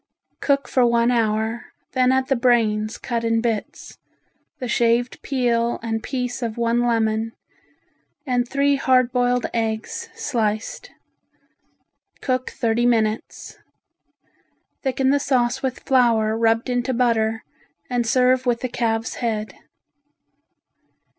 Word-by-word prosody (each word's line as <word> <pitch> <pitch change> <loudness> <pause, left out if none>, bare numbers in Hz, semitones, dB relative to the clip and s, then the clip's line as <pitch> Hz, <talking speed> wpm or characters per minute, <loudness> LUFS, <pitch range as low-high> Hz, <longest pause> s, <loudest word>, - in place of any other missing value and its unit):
Cook 280 -2 +1
for 255 - +2
one 235 0 +3
hour, 225 0 0 0.3
then 255 -1 +3
add 260 0 +2
the 270 - +2
brains 225 -3 +1
cut 235 -2 -3
in 230 0 +1
bits, 225 -2 -4 0.6
the 250 - -5
shaved 235 +1 +1
peel 240 -3 0
and 225 -1 -2
piece 250 0 -3
of 230 -2 -3
one 235 0 +1
lemon 225 -1 0 0.9
and 245 -2 0
three 280 +1 +2
hard 255 -2 +3
boiled 245 0 +1
eggs 225 -1 -3
sliced. 220 -5 -2 1.3
Cook 255 -1 -1
thirty 235 0 0
minutes. 220 -2 -1 1.2
Thicken 265 0 +1
the 285 - +3
sauce 255 -2 +1
with 260 -2 -3
flour 230 -4 +2
rubbed 225 +1 +1
into 245 0 -1
butter 225 -2 +1 0.4
and 245 -2 -1
serve 255 +2 +3
with 235 -1 +1
the 255 - -2
calves' 225 -2 -2
head. 215 -3 -2
240 Hz, 120 wpm, -22 LUFS, 225-255 Hz, 1.3 s, one